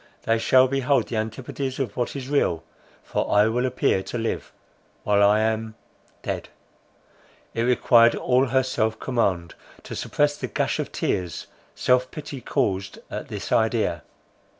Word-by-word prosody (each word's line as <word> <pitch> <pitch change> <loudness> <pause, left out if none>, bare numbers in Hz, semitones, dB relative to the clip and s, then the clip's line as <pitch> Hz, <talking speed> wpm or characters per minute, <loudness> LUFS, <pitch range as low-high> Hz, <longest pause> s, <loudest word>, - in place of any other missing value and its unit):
They 115 0 +2
shall 130 +3 +5
behold 135 -2 +1
the 115 - -2
antipodes 130 +4 -4
of 125 -7 -3
what 125 +1 -2
is 135 -2 -5
real—for 85 - -2
I 105 +1 +5
will 125 +3 0
appear 125 -6 +1
to 120 - -5
live—while 105 -2 -3
I 105 +1 +5
am—dead." 110 0 -5 1.0
It 115 - -1
required 120 -1 +5
all 130 +1 +2
her 130 +1 +2
self 110 -3 -1
command, 95 -9 0 0.3
to - - -7
suppress 145 0 0
the - - -4
gush - - -1
of - - -3
tears 90 -2 -2 0.3
self 125 0 +2
pity 145 -3 -7
caused 95 -3 -1
at - - -5
this - - -6
idea. - - +1
120 Hz, 140 wpm, -24 LUFS, 110-130 Hz, 1.0 s, shall